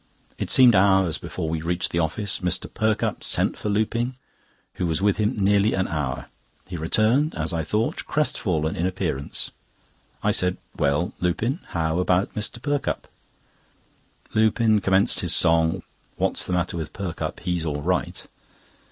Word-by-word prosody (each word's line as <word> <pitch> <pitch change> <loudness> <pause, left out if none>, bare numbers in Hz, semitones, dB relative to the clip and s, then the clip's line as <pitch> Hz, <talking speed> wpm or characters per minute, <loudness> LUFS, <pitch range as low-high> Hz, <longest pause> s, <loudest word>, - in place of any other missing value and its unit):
It - - -3
seemed 125 -2 +7
hours 95 -3 +3
before 80 - -5
we 80 0 -2
reached 85 +2 -1
the 85 - 0
office. 95 +5 -1
Mr. 90 0 -1
Perkupp 110 -1 -1
sent - - +1
for 105 - -4
Lupin, 115 +4 0 0.6
who 90 - -1
was 80 -2 0
with 100 0 +2
him 105 +3 0
nearly 100 +1 +3
an 95 0 0
hour. 75 -5 -3 0.4
He 90 - -7
returned, 110 - +2
as - - -2
I 80 -1 -1
thought, 105 +8 -2
crestfallen 85 - 0
in 85 - 0
appearance. 85 -7 -2 0.7
I - - +3
said: 90 0 +2 0.2
"Well, 70 +5 0
Lupin, 110 - -1
how 80 0 -1
about 90 +1 +1
Mr. 105 +3 -2
Perkupp?" 145 +2 -2 1.3
Lupin 110 0 +3
commenced 95 +4 +3
his 85 - +3
song: 80 +1 +4 0.3
"What's - - 0
the 90 - -2
matter 90 0 -1
with 80 -2 -5
Perkupp? 95 -4 -5
He's 90 -2 -1
all 75 -2 -3
right!" 90 +1 -1
90 Hz, 150 wpm, -24 LUFS, 85-105 Hz, 1.3 s, seemed